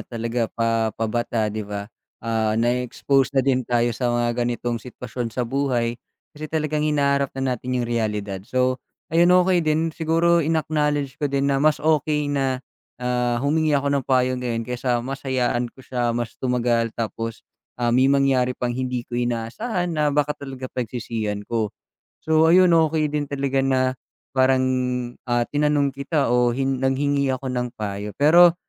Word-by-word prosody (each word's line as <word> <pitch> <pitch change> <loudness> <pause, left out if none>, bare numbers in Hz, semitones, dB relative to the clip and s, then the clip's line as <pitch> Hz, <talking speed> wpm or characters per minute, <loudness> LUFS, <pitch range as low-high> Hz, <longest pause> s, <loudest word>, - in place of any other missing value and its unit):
talaga 115 0 -2
pa 115 -1 0
pabata, 115 -1 -1
di 110 - -3
ba? 100 -1 -5 0.4
Ah, 110 -1 0
na-expose 125 +3 +1
na 130 - +4
din 130 -3 +1
tayo 120 -1 +2
sa 125 +2 -1
mga 120 0 +1
ganitong 120 -1 -2
sitwasyon 125 -1 -6
sa 120 +2 -2
buhay 120 -2 -1 0.3
kasi 155 0 -7
talagang 155 -1 -1
hinaharap 140 -2 +2
na 135 -1 0
natin 125 +1 -3
yung 125 - 0
realidad. 105 -4 -2
So, 130 0 +1 0.3
ayun, 170 +1 +5
okey 180 -1 +4
din. 160 +1 0
Siguro 165 +2 +2
in-acknowledge 150 -3 0
ko 145 - +1
din 140 0 +1
na 135 - +1
mas 155 0 +4
okey 150 -1 +1
na, 135 -2 -1 0.3
ah, 125 -1 0
humingi 155 0 +2
ako 140 0 0
ng 140 -2 0
payo 130 -1 +2
ngayon 115 -2 -2
kaysa 125 0 -1
mas 135 +1 -5
hayaan 125 -2 0
ko 130 +2 -17
siya, 120 -2 -1
mas 120 -1 -3
tumagal 120 -2 +1
tapos, 115 0 -4 0.3
ah, 120 -1 0
may 130 +2 +4
mangyari 135 -2 +2
pang 125 -1 -2
hindi 125 -1 -3
ko 120 0 -3
inaasahan 165 - -2
na 150 -1 +1
baka 145 0 +1
talaga 135 -3 -8
pagsisihan 115 -4 -3
ko. 110 -2 -1 0.5
So 160 0 +3
ayun, 180 +1 +6
okey 160 -1 +2
din 150 0 -1
talaga 135 -1 0
na 130 -1 +2 0.6
parang, 130 0 +4 0.6
ah, 120 -1 +1
tinanong 145 -1 +2
kita 140 +1 0
o 120 0 +3
hin 135 +2 0
nanghingi 140 +1 +1
ako 130 0 -4
ng 125 -1 -2
payo. 105 0 -4
Pero 170 +3 +7
130 Hz, 165 wpm, -23 LUFS, 120-145 Hz, 0.6 s, Pero